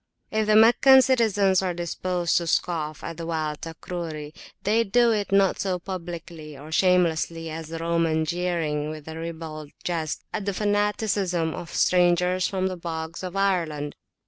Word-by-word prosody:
If 215 0 0
the 215 - +4
Meccan 245 +4 +7
citizens 210 -7 +3
are 185 -2 -2
disposed 175 0 -1
to 170 - -1
scoff 155 -2 -1
at 165 -1 -6
the 165 - -5
wild 155 -2 -2
Takruri, 160 -2 -6 0.3
they 220 +3 +3
do 235 +3 +3
it 205 -3 -1
not 195 -1 +3
so 185 -2 0
publicly 170 -4 -7
or 150 +3 -11
shamelessly 165 -2 +1
as 160 0 -6
the 165 +1 -6
Roman 165 -1 +1
jeering 165 -3 -1
with 155 -1 -8
ribald 160 -2 -6
jest 165 -3 -2
at 210 -2 -3
the 200 -2 -2
fanaticism 205 -5 0
of 170 - -7
strangers 180 0 +3
from 190 -1 -2
the 185 -1 -2
bogs 165 -1 -5
of 185 0 -6
Ireland. 165 -7 0
175 Hz, 155 wpm, -25 LUFS, 160-195 Hz, 0.3 s, Meccan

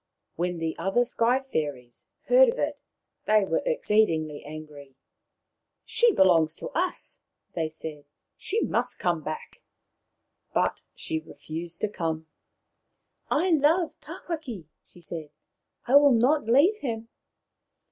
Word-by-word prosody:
When 175 +1 -1
the 165 -1 -2
other 195 +8 +2
Sky 245 +3 +1
fairies 140 -6 -4 0.2
heard - - +6
of 485 - -2
it - - -2 0.5
they 215 -2 +4
were - - 0
exceedingly 190 - +1
angry. 150 -3 -10 0.4
" - - -56
She 475 -1 +5
belongs 165 - +4
to - - -6
us," 360 +2 -2 0.3
they 160 -2 -1
said. 155 -2 -8 0.2
" - - -57
She 440 +3 +1
must 245 - -1
come 175 -3 0
back." 155 +1 -7 0.9
But - - +1
she 160 - -3
refused 165 +1 -6
to - - +2
come. 160 -5 -3 0.5
" - - -52 0.2
I 350 +5 +2
love 320 +3 +3
Tawhaki," 270 - -6 0.2
she 175 - -18
said. 160 -2 -7 0.3
" - - -49
I 265 +4 +7
will 285 -2 +6
not 255 +3 +3
leave 290 - +5
him." 230 - -4
195 Hz, 135 wpm, -27 LUFS, -, 0.9 s, I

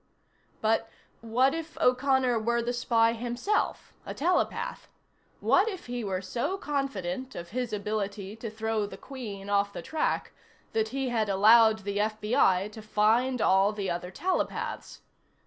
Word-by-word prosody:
But 225 +1 +1 0.3
what 245 +4 +2
if 325 -1 -6
O'Connor 255 -1 +3
were 235 +2 0
the 240 +1 -1
spy 230 -1 +2
himself 245 - -2
a - - -7
telepath? 350 +5 -1 0.5
What 390 +4 +4
if 380 -4 -7
he 245 -1 -4
were 190 -2 -2
so 240 - -2
confident 260 - -3
of 170 0 -7
his 245 +2 -3
ability 205 -1 -3
to 225 0 -5
throw 220 -1 -2
the - - -9
Queen 215 -8 -8
off 200 0 +1
the - - -6
track 315 -1 -1 0.4
that 220 0 +1
he 265 +2 -2
had 220 -3 0
allowed 220 +2 +6
the 200 +1 -2
FBI 210 -2 +2
to 220 - -9
find 220 +4 +2
all 195 +2 +4
the 200 -3 -2
other 175 +1 -4
telepaths? 365 - -3
225 Hz, 145 wpm, -28 LUFS, 205-255 Hz, 0.5 s, allowed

